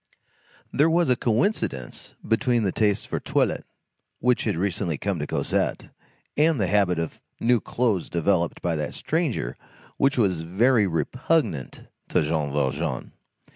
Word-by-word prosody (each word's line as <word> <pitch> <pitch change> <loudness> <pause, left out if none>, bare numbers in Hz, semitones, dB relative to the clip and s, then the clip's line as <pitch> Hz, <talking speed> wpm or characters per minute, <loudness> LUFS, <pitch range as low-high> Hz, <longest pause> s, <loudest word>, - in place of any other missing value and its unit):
There 150 +4 +4
was 170 -4 +3
a - - +5
coincidence 115 - -1
between 115 +1 +2
the 95 - +1
taste 105 -1 +1
for - - -2
the - - -7
toilet - - 0 0.5
which 125 0 +1
had 105 -6 0
recently 90 -3 -1
come 100 0 -2
to 75 - -3
Cosette, - - -1 0.4
and 155 -2 +3
the 100 - +2
habit 95 -2 +2
of 80 -1 -4 0.2
new 120 0 +3
clothes 110 -8 -1
developed 85 0 0
by 85 -2 0
that 75 -1 -3
stranger 150 - -1 0.4
which 135 0 +2
was 95 -8 +2
very 105 +6 +3
repugnant 125 - -1 0.2
to - - +2
Jean 75 -2 -1
Valjean. 70 -2 -1
100 Hz, 145 wpm, -25 LUFS, 85-125 Hz, 0.5 s, a